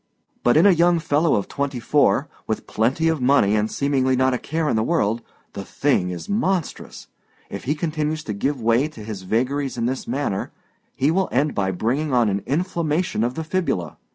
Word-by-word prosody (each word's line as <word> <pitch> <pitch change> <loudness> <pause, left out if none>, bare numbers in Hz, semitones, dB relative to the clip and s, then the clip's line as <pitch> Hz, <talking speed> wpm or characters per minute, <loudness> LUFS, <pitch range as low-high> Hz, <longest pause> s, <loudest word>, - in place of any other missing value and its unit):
But 120 +4 +4
in 165 - +6
a 200 - +8
young 175 0 +4
fellow 155 0 +2
of 100 - -1
twenty 140 -2 -3
four, 145 +3 +2 0.2
with 110 - -2
plenty 130 +9 0
of 160 -4 0
money 125 -6 +4
and 105 0 +1
seemingly 135 -2 +1
not 130 0 +2
a 125 - -1
care 160 +1 -2
in - - +1
the 110 - +2
world, 115 -5 0 0.3
the - - -6
thing 90 - 0
is 90 -1 -6
monstrous. 195 -5 -2 0.5
If - - -6
he 145 +4 0
continues 155 -1 -2
to 105 - -4
give 135 +7 -1
way 115 +5 +2
to 135 -9 -11
his 105 -3 -6
vagaries 130 +8 -1
in 115 - -1
this 130 +2 -3
manner, 125 -6 -2 0.4
he 140 +4 +2
will 190 +2 +1
end 145 +4 +1
by 95 -2 0
bringing 130 - -1
on 120 -3 +3
an 100 0 -1
inflammation 165 - 0
of 120 +2 -1
the 160 - -3
fibula. 160 - -2
135 Hz, 200 wpm, -22 LUFS, 115-155 Hz, 0.5 s, a